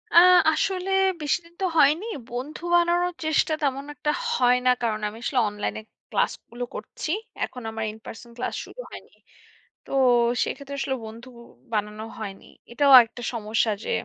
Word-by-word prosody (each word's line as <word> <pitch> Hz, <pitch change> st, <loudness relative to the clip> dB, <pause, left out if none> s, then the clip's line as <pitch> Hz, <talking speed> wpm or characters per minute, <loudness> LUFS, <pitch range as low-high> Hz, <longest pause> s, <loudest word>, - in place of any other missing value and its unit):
আ -, -, +7 dB, 0.3 s
আসলে 370 Hz, +3 st, -1 dB, 0.3 s
বেশিদিন 335 Hz, +3 st, -2 dB
তো -, -, +2 dB
হয়নি। 305 Hz, +7 st, +4 dB, 0.2 s
বন্ধু 255 Hz, +7 st, -6 dB
বানানোর 345 Hz, +1 st, +2 dB
চেষ্টা 315 Hz, 0 st, +2 dB
তেমন 275 Hz, -1 st, -1 dB
একটা 300 Hz, -, -1 dB, 0.2 s
হয় 250 Hz, -, +4 dB
না 250 Hz, -, +6 dB
কারণ 215 Hz, -2 st, 0 dB
আমি 210 Hz, -, -8 dB
আসলে 255 Hz, 0 st, +1 dB
অনলাইনে 210 Hz, +1 st, -4 dB, 0.3 s
ক্লাসগুলো 240 Hz, +1 st, -2 dB
করছি। -, -, -6 dB, 0.4 s
এখন 250 Hz, -, -10 dB
আমার 220 Hz, 0 st, -4 dB
in-person 220 Hz, +2 st, -11 dB
ক্লাস 250 Hz, -, -3 dB
শুরু -, -, -15 dB
হয়নি। -, -, -12 dB, 0.7 s
তো -, -, -16 dB, 0.5 s
সেক্ষেত্রে 280 Hz, 0 st, -6 dB
আসলে 270 Hz, -1 st, -1 dB
বন্ধু 230 Hz, +3 st, -10 dB, 0.4 s
বানানো 210 Hz, 0 st, -2 dB, 0.2 s
হয়নি। 200 Hz, -3 st, -7 dB, 0.3 s
এটাও 280 Hz, +2 st, +4 dB
একটা 235 Hz, +2 st, -11 dB
সমস্যা 220 Hz, 0 st, 0 dB
যে -, -, -4 dB
255 Hz, 145 wpm, -25 LUFS, 220-305 Hz, 0.7 s, আ